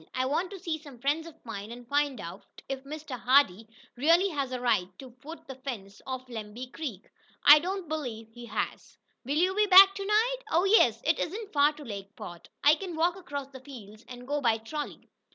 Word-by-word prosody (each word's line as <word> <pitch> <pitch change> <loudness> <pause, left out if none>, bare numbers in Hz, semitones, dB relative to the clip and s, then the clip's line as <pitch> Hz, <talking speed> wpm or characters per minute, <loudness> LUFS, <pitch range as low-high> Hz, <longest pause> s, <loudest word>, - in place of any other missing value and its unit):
I 255 0 0
want 310 +7 -1
to 400 - -8
see 335 -3 -4
some 285 -5 -13
friends 290 +6 -1
of 325 - -12
mine, 210 -1 -7
and 240 0 -10
find 285 0 0
out 170 +3 -10
if 270 -1 -5
Mr. 290 -3 -7
Hardee 245 -5 +3 0.3
really 335 +9 +4
has 280 -6 -2
the 255 -1 -4
right 235 -7 +1
to 255 -3 -12 0.5
fence 200 -7 -7
off 260 -1 -5
Lemby 235 +2 -8
Creek. 260 - -6 0.4
I 295 +1 +10
don't 370 +2 -4
believe 240 -8 -5
he 240 +1 -11
has." - - -4 0.3
"Will 280 +3 -1
you 365 +3 +3
be 420 +1 +2
back 390 +1 +9
to 395 0 -5
night?" 450 +4 +2
"Oh, 340 -1 +3
yes. 250 - +4
It 315 0 +2
isn't 410 +4 -4
far 290 +1 +4
to 295 - -11
Lakeport. 195 -5 -9
I 290 - +7
can 350 +1 -4
walk 340 +2 +1
across 285 -7 -6
the 265 -1 -11
fields 230 -5 -12
and 245 0 -10
go 290 +1 -1
by 230 -3 +3
trolley." 290 +7 -7
280 Hz, 200 wpm, -28 LUFS, 235-325 Hz, 0.5 s, I